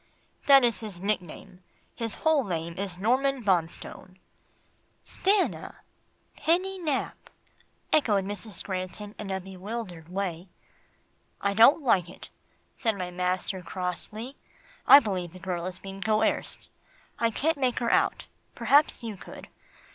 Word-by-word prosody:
"That 275 -2 +8
is 235 -2 +3
his 210 -6 -6
nickname, 185 -2 -3 0.3
his 230 -3 -3
whole 315 -3 +2
name 170 -4 -3
is 190 -2 -4
Norman 260 +5 +1
Bonstone." 185 0 -2 0.9
"Stanna 395 0 0 0.5
Penny 370 +4 0
Nap," 300 -6 -3 0.6
echoed 210 -10 +3
Mrs. 205 -1 -3
Granton 190 +2 -5
in 210 - -5
a 190 0 -1
bewildered 190 -2 -7
way. 180 -2 -3 0.9
"I 200 0 0
don't 230 +9 +6
like 185 -9 +3
it," 185 - -12 0.4
said 225 -5 0
my 180 -1 -4
master 180 +1 -2
crossly. 190 +8 -4 0.5
"I 280 - +11
believe 185 - -3
the 185 - -11
girl 180 -1 -3
is 185 -1 -5
being 195 +1 -9
coerced. 220 +1 0 0.5
I 230 - +3
can't 300 +6 0
make 255 -3 +1
her 235 -2 0
out; - - +2 0.3
perhaps 290 -3 +3
you 225 -3 -5
could. - - -11
200 Hz, 130 wpm, -27 LUFS, 185-245 Hz, 0.9 s, I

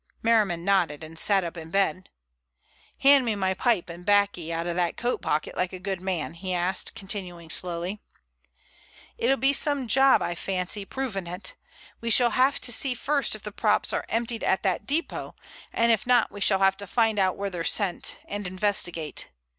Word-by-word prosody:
Merriman 210 -7 +2
nodded 175 -7 +1
and 160 +1 -6
sat 195 -2 +3
up 170 0 -5
in 165 -1 -8
bed. 185 -1 0 0.9
"Hand 275 -1 +7
me 225 -3 -1
my 190 -1 0
pipe 220 -1 +1
and 170 +1 -9
baccy 200 -4 +2
out 165 0 -2
of 175 -1 -2
that 175 -1 0
coat 240 +1 -1
pocket 150 - -1
like 180 +1 -1
a - - -5
good 190 -1 -4
man," 180 -4 -3
he 180 +2 -4
asked, 180 +5 0
continuing 185 -5 -5
slowly: 180 +4 -2 1.2
"It'll 270 - +2
be 270 +3 +2
some 285 -3 +1
job, 270 +4 +5
I 175 - -2
fancy, 190 +3 -2
proving 205 -7 -4
it. 180 +3 -5 0.5
We 230 - -3
shall 240 +1 +4
have 265 +3 +2
to 245 - +2
see 250 +2 +2
first 280 0 0
if 215 - -12
the 210 - -6
props 210 +1 +1
are - - -2
emptied 230 0 -1
at 190 - +1
that 195 +1 -1
depot, 315 +5 -2 0.4
and 230 0 +2
if 225 +1 0
not 245 -2 +4
we 205 +1 -9
shall 195 - +4
have 195 0 +4
to 200 - -7
find 225 0 +1
out 185 -1 +2
where 200 0 -3
they're 175 -2 -4
sent, 185 0 0
and 205 -1 -5
investigate. 180 -4 -2
195 Hz, 190 wpm, -26 LUFS, 175-230 Hz, 1.2 s, Hand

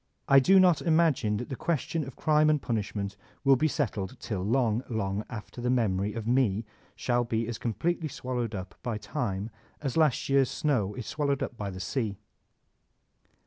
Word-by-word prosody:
I 140 -1 +8
do 190 +9 +6
not 180 -4 +5
imagine 155 -10 +2
that 120 - -5
the 135 - -3
ques 155 0 0
tion 165 -2 -2
of 135 - -9
crime 155 -1 +3
and 150 -1 +3
punishment 105 -4 -3 0.3
will 135 -1 +6
be 155 +5 +2
settled 120 - -2
till 100 -5 -3
long, 115 +2 +1
long 105 -3 -1
after 115 +1 -7
the 125 - 0
memory 105 -5 +1
of 115 0 -5
me 115 -3 +2 0.3
shall 120 -1 +1
be 115 -1 -1
as 120 -2 -4
completely 160 - -1
swallowed 125 -5 -3
up 95 -1 -6
by 120 -3 -2
time 105 0 -3 0.3
as 140 0 -3
last 155 -6 +3
year's 135 -2 +3
snow 115 -10 0
is 125 -3 -5
swallowed 140 -2 0
by 105 -3 -4
the 95 -1 -7
sea. 105 +1 -2
120 Hz, 180 wpm, -28 LUFS, 105-140 Hz, 0.3 s, I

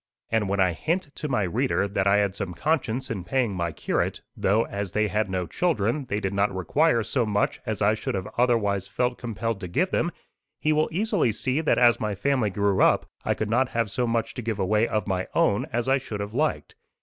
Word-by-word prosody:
And 110 -3 +1
when 100 0 0
I 90 -2 +3
hint 165 - -2
to 150 - -3
my 125 -7 +1
reader 90 +1 0
that 100 -1 0
I 100 +1 +5
had 100 -2 +1
some 95 -3 -5
conscience 130 - -1
in 100 -6 -3
paying 125 0 0
my 85 -2 -2
curate, - - -2
though, 105 +4 +2
as 100 -2 -4
they 105 0 +1
had 105 +2 0
no 90 -1 -1
children, 140 - 0
they 105 -3 -2
did 95 -2 -2
not 100 +1 +2
require 115 - +2
so 125 +4 0
much 105 -2 0
as 110 -1 -1
I 105 +1 +4
should 110 - -3 0.2
otherwise 105 -6 +1
have - - -26
felt 125 0 +1
compelled 115 -2 -3
to 90 - -5
give 180 - 0
them, 175 - +1 0.5
he 155 - +2
will 155 +1 +2
easily 195 - +1
see 130 +7 -1
that 160 - +2
as 120 -1 +5
my 105 -2 -2
family 130 -1 +1
grew 100 0 +1
up - - +4 0.2
I - - 0
could 110 0 -3
not 125 +2 +2
have 115 -3 +1
so 125 +2 0
much 115 -1 -1
to - - -5
give 110 -2 -2
away 105 +4 +2
of 110 -4 -1
my 95 -2 -1
own 100 - +2
as 120 +2 -1
I 135 +1 +3
should 105 -4 -6
have 100 +1 -5
liked. 150 +5 -1
110 Hz, 230 wpm, -25 LUFS, 100-125 Hz, 0.5 s, I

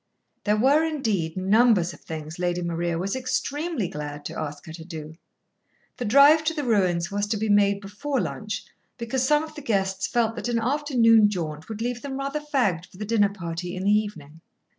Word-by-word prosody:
There 210 0 +2
were, 275 +7 +4
indeed, 220 - -1
numbers 195 -2 +3
of - - -14
things 160 +1 -7
Lady 175 0 -1
Maria 170 0 -1
was 195 +6 -2
extremely 275 - -2
glad 145 -2 -7
to - - -5
ask 145 -1 -6
her 160 - -9
to 165 0 -9
do. 160 -2 -8 0.8
The 245 - -3
drive 285 +8 +6
to 325 0 0
the 295 - -2
ruins 185 -7 +1
was 205 +1 -1
to 215 0 -1
be 215 +1 -2
made 200 -1 +4
before 235 +8 -3
lunch, - - -4 0.3
because 235 +2 -2
some 295 +3 +3
of 315 - -9
the 295 - -8
guests 195 -6 0
felt 225 -2 0
that 240 - -3
an 235 - +1
afternoon 230 -4 +4
jaunt 160 -4 -5
would 220 0 -4
leave 245 0 -3
them 270 -1 -5
rather 275 +2 -2
fagged 240 - 0
for 185 - -18
the 210 - -4
dinner 210 -2 +3
party 175 -2 -5
in 185 - -4
the 200 - +3
evening. 165 -8 -2
205 Hz, 200 wpm, -25 LUFS, 175-255 Hz, 0.8 s, drive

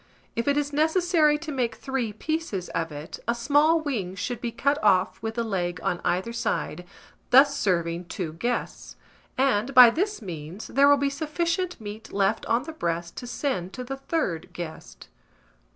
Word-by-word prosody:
If 230 +2 -2
it 285 0 +3
is 290 0 -1
necessary 315 0 +3
to 310 0 -6
make 245 -5 -1
three 265 -5 -2
pieces 220 - -3
of 165 -1 -2
it, 145 +1 -8
a 235 - +2
small 290 +6 +3
wing 215 -12 -3
should 240 +4 -4
be 235 - -2
cut 280 +4 0
off 190 -3 +3
with 225 0 -4
the 235 - 0
leg 180 -5 -2
on 175 - -1
either 190 +6 0
side, 180 -5 -2 0.4
thus 275 +2 +6
serving 170 -3 0
two 170 -2 -5
guests; 240 +9 -3 0.4
and, 260 -1 +1
by 250 -2 +10
this 400 - -1
means, 175 -1 -7
there 275 +3 +4
will 285 0 +6
be 280 0 0
sufficient 335 +4 -2
meat 215 0 -8
left 200 +2 0
on 230 +2 +2
the 320 +2 -7
breast 170 - -3
to 245 - -6
send 220 -8 -2
to 255 - -5
the 270 +2 -5
third 270 - -2
guest. 170 -2 -8
235 Hz, 175 wpm, -26 LUFS, 185-285 Hz, 0.4 s, by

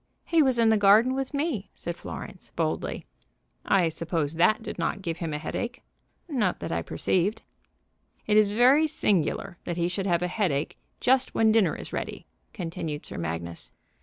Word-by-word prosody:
"He 330 -2 +3
was 260 -4 +3
in 230 -1 +4
the 220 - +4
garden 210 +6 +6
with 270 0 -2
me," 285 - -2
said 170 - -5
Florence, 180 - -8
boldly. 160 -2 -2 0.6
"I 185 -4 +3
suppose 160 -2 -2
that 215 +7 +3
did - - -6
not 190 +3 -2
give 165 -2 -3
him 165 -2 -3
a 150 - -2
headache." 240 +11 -4 0.4
"Not 280 -7 0
that - - -5
I - - 0
perceived." 200 +5 0 0.8
"It 210 - +2
is 215 -1 +5
very 255 +9 +5
singular 190 - 0
that 175 - -3
he 170 0 +1
should 190 +2 -2
have 175 -1 +2
a - - +1
headache 175 -7 -1 0.2
just 260 +1 +2
when 220 -1 +4
dinner 220 -3 +3
is - - -8
ready," - - -4 0.3
continued 165 -5 -5
Sir - - -7
Magnus. 85 +1 -5
195 Hz, 175 wpm, -27 LUFS, 165-235 Hz, 0.8 s, garden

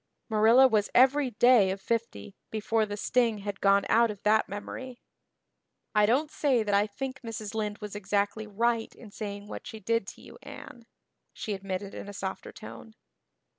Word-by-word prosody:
Marilla 225 +4 +6
was 215 -4 +1
every 265 +2 +5
day 240 -3 +5
of 190 +1 -3
fifty 230 -1 -3
before 220 0 0
the 205 0 -5
sting 235 0 +1
had 200 0 -6
gone 200 0 +4
out 230 +1 +4
of 205 -2 -8
that 215 +1 +3
memory. 245 +5 -7 0.9
"I 210 -1 +4
don't 285 +7 +1
say 265 -8 +1
that 205 -1 -2
I 200 +1 +3
think 260 +5 -6
Mrs. 220 -3 -6
Lynde 210 -1 -2
was 210 -1 -7
exactly 205 +1 -1
right 230 +2 -1
in 220 -4 -13
saying 205 -1 -6
what - - -8
she 220 - -8
did 230 0 -1
to - - -10
you, - - -13
Anne," 235 -1 -11 0.5
she 215 - -4
admitted 195 0 -5
in 205 - -8
a - - -8
softer 190 -1 -5
tone. 220 0 -11
215 Hz, 175 wpm, -28 LUFS, 205-235 Hz, 0.9 s, Marilla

